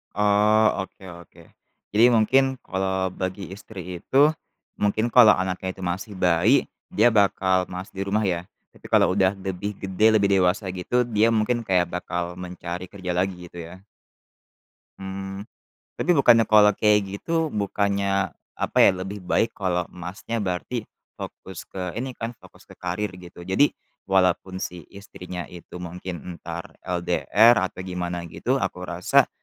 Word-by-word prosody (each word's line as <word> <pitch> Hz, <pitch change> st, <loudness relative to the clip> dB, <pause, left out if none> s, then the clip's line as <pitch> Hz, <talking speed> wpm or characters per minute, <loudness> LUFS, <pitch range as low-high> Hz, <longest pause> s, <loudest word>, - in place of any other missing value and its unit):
Oh, 105 Hz, 0 st, +3 dB
oke 95 Hz, -, -15 dB, 0.2 s
oke. -, -, -19 dB, 0.5 s
Jadi 110 Hz, +3 st, +7 dB
mungkin 130 Hz, +4 st, +3 dB
kalau 95 Hz, 0 st, -1 dB
bagi 95 Hz, +1 st, -4 dB
istri 90 Hz, -4 st, -9 dB
itu, 140 Hz, +3 st, +5 dB, 0.5 s
mungkin 105 Hz, +2 st, +1 dB
kalau 120 Hz, -2 st, +7 dB
anaknya 95 Hz, 0 st, -1 dB
itu 95 Hz, 0 st, -10 dB
masih 95 Hz, +4 st, -6 dB
bayi 90 Hz, +10 st, +3 dB, 0.2 s
dia 185 Hz, -, +4 dB
bakal 95 Hz, -4 st, +3 dB
males 90 Hz, +2 st, -6 dB
di 95 Hz, -, -2 dB
rumah 100 Hz, +2 st, 0 dB
ya, 85 Hz, -2 st, -1 dB, 0.3 s
tapi -, -, -19 dB
kalau 95 Hz, -, +4 dB
udah 95 Hz, -2 st, +4 dB
lebih 95 Hz, +1 st, -4 dB
gede 100 Hz, +3 st, +3 dB
lebih 105 Hz, -2 st, +3 dB
dewasa 95 Hz, +2 st, +2 dB
gitu 95 Hz, +7 st, -1 dB
dia 115 Hz, 0 st, +3 dB
mungkin 115 Hz, +2 st, +1 dB
kayak 90 Hz, -4 st, +2 dB
bakal 90 Hz, 0 st, -3 dB
mencari 90 Hz, 0 st, -7 dB
kerja 95 Hz, -3 st, -5 dB
lagi 90 Hz, -1 st, -2 dB
gitu 85 Hz, 0 st, -9 dB
ya? 95 Hz, +1 st, -14 dB, 1.2 s
Mmm. 95 Hz, +1 st, -6 dB, 0.5 s
Tapi 180 Hz, -, +2 dB
bukannya 120 Hz, -5 st, +6 dB
kalau 105 Hz, -1 st, +6 dB
kayak 105 Hz, -1 st, +4 dB, 0.2 s
gitu, 165 Hz, -1 st, 0 dB
bukannya 100 Hz, -2 st, 0 dB, 0.2 s
apa -, -, -3 dB
ya, -, -, +8 dB
lebih 100 Hz, +2 st, -6 dB
baik 115 Hz, +5 st, +1 dB
kalau 90 Hz, -3 st, -1 dB
Masnya 90 Hz, +6 st, -5 dB
berarti 100 Hz, +5 st, -3 dB, 0.3 s
fokus 95 Hz, -2 st, -8 dB
ke 90 Hz, -2 st, -5 dB
ini 130 Hz, +1 st, -4 dB
kan, 115 Hz, +1 st, -4 dB
fokus -, -, -18 dB
ke -, -, -15 dB
karir 90 Hz, +3 st, -3 dB
gitu. 85 Hz, -1 st, -12 dB
Jadi 95 Hz, +11 st, +3 dB, 0.4 s
walaupun 95 Hz, 0 st, +2 dB
si 90 Hz, -2 st, -5 dB
istrinya 90 Hz, -3 st, -8 dB
itu 90 Hz, 0 st, -11 dB
mungkin 90 Hz, 0 st, -6 dB, 0.2 s
entar -, -, -8 dB
LDR 100 Hz, +6 st, +3 dB
atau -, -, -14 dB
gimana 90 Hz, -1 st, -4 dB
gitu, 120 Hz, +11 st, -1 dB
aku 90 Hz, -, -3 dB
rasa 90 Hz, 0 st, +2 dB
95 Hz, 150 wpm, -24 LUFS, 90-110 Hz, 1.2 s, ya